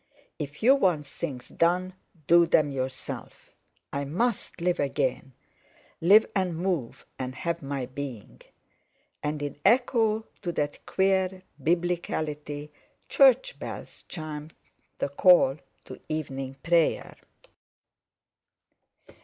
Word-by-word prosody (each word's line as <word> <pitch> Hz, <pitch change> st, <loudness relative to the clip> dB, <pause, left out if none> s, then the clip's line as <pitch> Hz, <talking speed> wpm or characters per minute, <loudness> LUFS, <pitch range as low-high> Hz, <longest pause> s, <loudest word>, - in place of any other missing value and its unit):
If 150 Hz, +4 st, -6 dB
you 255 Hz, +4 st, +8 dB
want 180 Hz, -, +2 dB
things 140 Hz, -3 st, -6 dB
done, 180 Hz, +2 st, +1 dB, 0.3 s
do 170 Hz, +2 st, +6 dB
them 150 Hz, -3 st, +3 dB
yourself. 130 Hz, -1 st, -6 dB, 0.4 s
I 140 Hz, -, -1 dB
must 195 Hz, -, -1 dB
live 175 Hz, +1 st, 0 dB
again—live 140 Hz, -, 0 dB
and 185 Hz, -4 st, 0 dB
move 170 Hz, -9 st, -2 dB
and 130 Hz, 0 st, -4 dB
have 170 Hz, +1 st, -2 dB
my 135 Hz, -2 st, -3 dB
being." 125 Hz, -, -8 dB, 0.8 s
And 150 Hz, 0 st, -2 dB
in 145 Hz, -1 st, -4 dB
echo 225 Hz, -1 st, +3 dB, 0.2 s
to 175 Hz, -, -2 dB
that 145 Hz, -2 st, -2 dB
queer 190 Hz, -1 st, +1 dB, 0.2 s
biblicality 155 Hz, -4 st, -2 dB, 0.4 s
church -, -, +4 dB
bells -, -, -8 dB
chimed 155 Hz, -1 st, -7 dB, 0.4 s
the -, -, -1 dB
call 140 Hz, -2 st, +5 dB, 0.3 s
to 130 Hz, -, -10 dB
evening 135 Hz, -4 st, -4 dB
prayer. 170 Hz, -1 st, +2 dB
160 Hz, 105 wpm, -27 LUFS, 140-185 Hz, 0.8 s, you